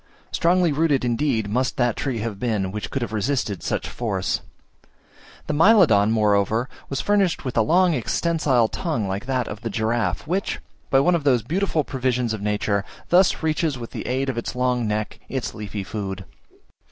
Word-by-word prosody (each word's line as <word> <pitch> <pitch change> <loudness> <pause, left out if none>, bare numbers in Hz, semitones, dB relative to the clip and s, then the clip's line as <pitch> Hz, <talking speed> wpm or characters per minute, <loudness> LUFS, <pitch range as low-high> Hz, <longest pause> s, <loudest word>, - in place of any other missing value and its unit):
Strongly 175 0 +3
rooted, 145 -3 +2
indeed, 120 -2 0
must 125 +5 -1
that 120 -3 +2
tree 130 -4 -2
have 105 -3 -4
been, 105 -6 -1
which 105 0 -5
could 135 - -2
have 115 - -5
resisted 110 -2 -1
such - - -2
force! 100 -6 -2 1.0
The 150 - -2
Mylodon, 155 - +5
moreover, 110 +2 +2 0.2
was 135 - -2
furnished 200 -7 +1
with 130 - -3
a 115 - +4
long 175 +8 +3
extensile 135 -2 +1
tongue 150 - -2
like 100 +6 -4
that 130 -3 0
of 105 0 -7
the 115 - -3
giraffe, 115 +4 -1
which, 185 +6 -1 0.3
by 135 - +4
one 180 +5 +3
of 170 -3 0
those 125 -6 +3
beautiful 165 - 0
provisions 125 -3 -1
of 110 - -5
nature, 105 -1 0 0.3
thus 180 -1 +4
reaches 155 -2 0
with 115 -1 -8
the - - -6
aid 130 +2 0
of 125 -3 -1
its 115 - -5
long 125 -2 +1
neck 105 0 -2
its 130 -2 -3
leafy 105 -1 -5
food. 95 -2 -5
125 Hz, 175 wpm, -23 LUFS, 110-150 Hz, 1.0 s, Mylodon